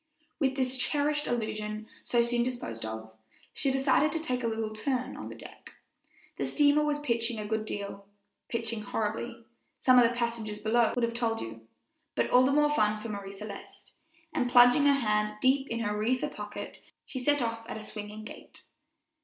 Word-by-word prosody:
With 270 -3 +1
this 260 -1 -1
cherished 295 +2 +1
illusion 215 -2 -2 0.2
so 240 -1 +3
soon 240 0 +1
disposed 235 - -3
of, 110 0 -6 0.4
she 275 - +1
decided 270 +3 +3
to 325 - 0
take 255 -6 -2
a - - +1
little 220 -1 -2
turn 255 +3 -2
on - - -7
the - - -8
deck. - - -13 0.6
The - - -1
steamer 295 0 +4
was 295 -1 +1
pitching 235 -5 0
a 210 - -4
good 220 0 -1
deal 200 -1 -5 0.4
"pitching 230 -1 -2
horribly," 225 +3 -3 0.3
some 255 -1 +6
of - - +7
the 235 +1 +2
passengers 230 -3 -2
below 220 +2 +2
would 245 - 0
have 235 0 +1
told 230 -1 0
you, 115 0 -8 0.5
but - - 0
all 250 - +7
the 260 +2 +4
more 295 +1 +4
fun 215 -4 +2
for 225 +2 -6
Marie 200 -2 -5
Celeste; 200 0 -10 0.4
and 255 -6 0
plunging 245 +4 +7
her 275 -5 +3
hand 210 0 +1
deep 270 +2 +3
in 230 0 -2
her 210 -2 -1
reefer 235 +5 0
pocket, 210 0 -7 0.2
she 280 -4 -5
set 290 +3 +2
off 230 -1 -3
at - - -4
a 215 - -7
swinging 210 0 -7
gait. - - -12
235 Hz, 185 wpm, -29 LUFS, 215-260 Hz, 0.6 s, of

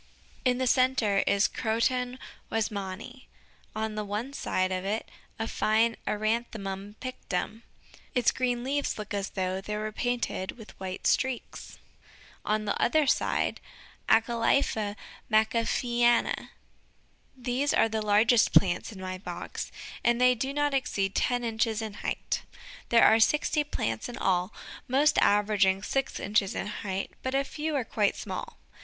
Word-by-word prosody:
In 250 -1 +2
the 260 - 0
center 250 -5 +3
is 200 0 +4
Croton 245 +3 0 0.3
"Weismanni," 215 +3 -4 0.5
on 220 0 -2
one 220 +7 -3
side 185 -8 0
of 185 0 -2
it 210 +3 -2 0.3
a 225 - -2
fine 225 +1 +2
Eranthemum 210 -2 -2
pictum; 225 -3 -4 0.5
its 245 -2 +4
green 245 -2 -1
leaves 285 +2 -1
look 210 -1 -6
as 200 -1 -2
though 185 0 -2
they 210 +2 -4
were 215 0 -3
painted 240 -5 -2
with 220 -3 -11
white 190 -1 -5
streaks; 260 -3 -1 0.7
on 215 0 0
the 205 - 0
other 310 +4 +3
side, 265 - +1 0.5
Acalypha 225 -2 +2 0.4
"Macafeeana." 235 +2 +2 0.9
These 255 +3 0
are - - +4
the 220 0 -2
largest 215 +3 +4
plants 180 +2 +3
in 200 - -10
my 185 0 -5
box, 175 -2 -6 0.3
and 240 0 +3
they 250 0 +6
do 265 +3 -2
not 290 0 0
exceed 205 -8 0
ten 245 -1 +1
inches 225 -1 0
in 220 -2 -4
height. - - -2 0.5
There 230 -1 +6
are 220 - +6
sixty 300 +5 +3
plants 115 - -3
in 245 - -7
all, 180 -2 +1 0.4
mostly 280 +4 +3
averaging 200 -2 +3
six 270 +4 -1
inches 205 -1 +1
in - - -2
height, 195 -2 -4
but 260 +1 -2
a 275 - +3
few 305 +2 -3
are 260 -4 0
quite 210 -2 +1
small. - - -6
225 Hz, 140 wpm, -28 LUFS, 205-250 Hz, 0.9 s, they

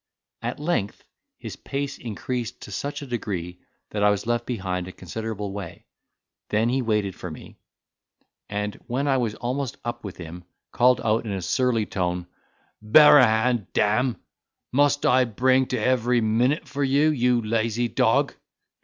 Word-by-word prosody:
At - - -4
length 150 - -2 0.3
his - - -7
pace 140 0 -4
increased 120 +1 -4
to - - -9
such 145 +7 -4
a - - -6
degree 95 -8 -4 0.3
that 105 - -2
I 105 - +5
was 100 0 0
left 120 0 -1
behind 95 -6 -3
a - - -7
considerable 105 +2 -5
way: 100 -4 -8 0.6
then 110 +2 +2
he 130 +2 +1
waited 105 -5 0
for 90 - -7
me; 80 - -11 0.9
and 105 0 -2
when 135 +4 -1
I 135 -1 +3
was 115 -4 -1
almost 130 +1 -3
up 120 - -4
with 100 -3 -7
him, 85 +1 -9 0.3
called 125 0 +4
out 110 +1 +1
in 105 - -4
a 95 - -2
surly 115 +4 +1
tone, 90 -2 -2 0.6
"Bear 145 +7 +8
a 130 - +7
hand, 110 -1 +1
damme! 115 +4 +1 0.5
must 145 +2 +2
I 130 +1 +5
bring 130 +3 +2
to 130 - -2
every 125 +1 +2
minute 120 +7 +1
for 140 +1 -2
you, 140 +3 +3
you 125 -3 +2
lazy 115 +2 0
dog." - - +2
115 Hz, 160 wpm, -24 LUFS, 105-130 Hz, 0.9 s, Bear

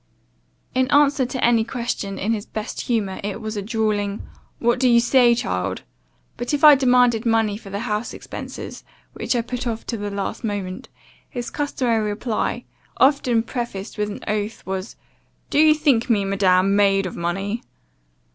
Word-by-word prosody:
In 260 +1 +1
answer 280 -3 +4
to 255 0 -4
any 235 -2 +4
question, 230 -4 -4
in 215 +4 0
his 210 -2 -4
best 215 -1 -5
humour, 210 -6 -1
it 205 +1 -3
was 220 -1 -5
a 205 - -2
drawling 210 -1 -1 0.3
'What 240 +1 +1
do 255 -1 +4
you 235 -1 +6
say, 240 0 +4
child?' 90 - -2 0.5
But 245 +5 -1
if 285 - -5
I 300 -1 +11
demanded 250 -4 +4
money 225 -3 +2
for 205 -1 -10
the 200 +2 -4
house 215 -1 -2
expences, - - -8 0.3
which - - -2
I 235 - +1
put 250 +1 -4
off 225 -1 -3
till 230 - -4
the 205 0 -3
last 200 +3 -4
moment, 200 -4 -4 0.4
his 240 -1 -5
customary 240 -7 0
reply, 215 +2 -2 0.3
often 260 -4 +3
prefaced 230 -4 -5
with 210 0 0
an 205 - -7
oath, 210 +1 -3
was, 190 +2 -4 0.6
'Do - - +2
you 310 0 +6
think 275 -6 +2
me, 205 -4 +2
madam, 195 0 +3
made 195 -1 +3
of 185 - -5
money? 195 +6 -2
225 Hz, 170 wpm, -22 LUFS, 200-245 Hz, 0.6 s, I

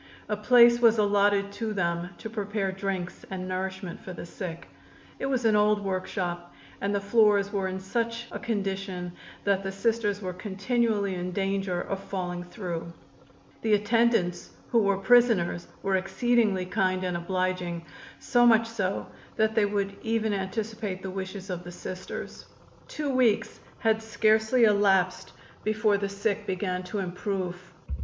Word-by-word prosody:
A 210 - 0
place 235 +2 +6
was 230 -2 +5
allotted 205 -1 +3
to 220 +1 -3
them 170 -2 -1
to - - -6
prepare 210 -2 -2
drinks 190 -2 -4
and 185 -1 -4
nourishment 190 0 -4
for 185 - -8
the - - -7
sick. 170 -1 -7 0.5
It 270 - -1
was 255 -3 0
an 220 -1 +5
old 210 -1 +3
workshop, 180 -2 -3 0.3
and 200 +1 0
the - - +2
floors 205 -1 +3
were 195 -2 0
in 190 0 -4
such 230 +4 -2
a - - -5
condition 195 -4 -3 0.3
that 200 -1 +2
the 195 0 -3
Sisters 205 0 0
were 185 -3 -4
continually 205 +1 0
in 180 0 -3
danger 195 -2 -1
of 195 - -3
falling 180 -2 -4
through. 175 -3 -5 0.7
The 220 -2 +4
attendants, 210 -4 +2 0.2
who 235 - +5
were 200 -1 +2
prisoners, 195 -5 +3 0.2
were 195 -1 +2
exceedingly 195 0 +1
kind 185 0 0
and 180 -1 -1
obliging, 180 -1 -2 0.3
so 245 -2 +2
much 230 -1 +6
so 200 -4 -2 0.3
that 220 0 +2
they 220 -2 +3
would 200 -1 -1
even 220 -1 0
anticipate 205 0 -3
the 190 - -4
wishes 190 0 -5
of 180 -1 -4
the 175 - -8
Sisters. 185 +1 -7 0.4
Two 295 -2 -3
weeks 250 -5 +2 0.2
had 220 -1 +2
scarcely 220 +2 +3
elapsed 195 -4 +3 0.3
before 215 -1 +2
the 200 0 -2
sick 200 +1 -2
began 185 -1 -1
to 205 - -4
improve. 185 -1 -3
200 Hz, 150 wpm, -27 LUFS, 185-220 Hz, 0.7 s, place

